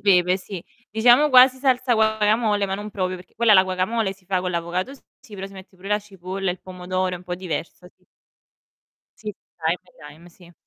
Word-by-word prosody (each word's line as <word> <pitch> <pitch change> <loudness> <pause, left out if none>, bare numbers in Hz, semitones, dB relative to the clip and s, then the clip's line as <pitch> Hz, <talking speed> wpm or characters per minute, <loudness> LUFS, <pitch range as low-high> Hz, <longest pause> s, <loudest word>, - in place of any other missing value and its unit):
Pepe, 180 -2 +4
sì. 185 -2 -8 0.3
Diciamo 240 +7 +5
quasi 260 -1 +7
salsa 255 -1 +2
guacamole, 220 -1 +2
ma 190 - -2
non 205 +2 -6
proprio, 185 -2 -2
perché 180 - -16
quella, 230 -1 +4
la 190 -2 +8
guacamole, 190 +3 -1
si 190 - -26
fa 185 0 0
con 180 0 -2
l'avocado 175 +8 -3
s 275 - -20 0.2
sì, 215 - -14
però 195 -1 -6
si 195 - -14
mette 190 0 -13
pure 190 +2 -10
la 210 0 +2
cipolla, 195 -2 -5
il 180 - -6
pomodoro, 185 0 -3
è - - -6
un 180 - -16
po' 180 - -3
diversa, 180 0 -6
sì. - - -36 1.1
Sì, 215 -1 -6 0.3
anche 175 +2 -2
il - - -15
lime, 170 +2 -16
sì. 175 0 -18
190 Hz, 210 wpm, -23 LUFS, 180-215 Hz, 1.1 s, la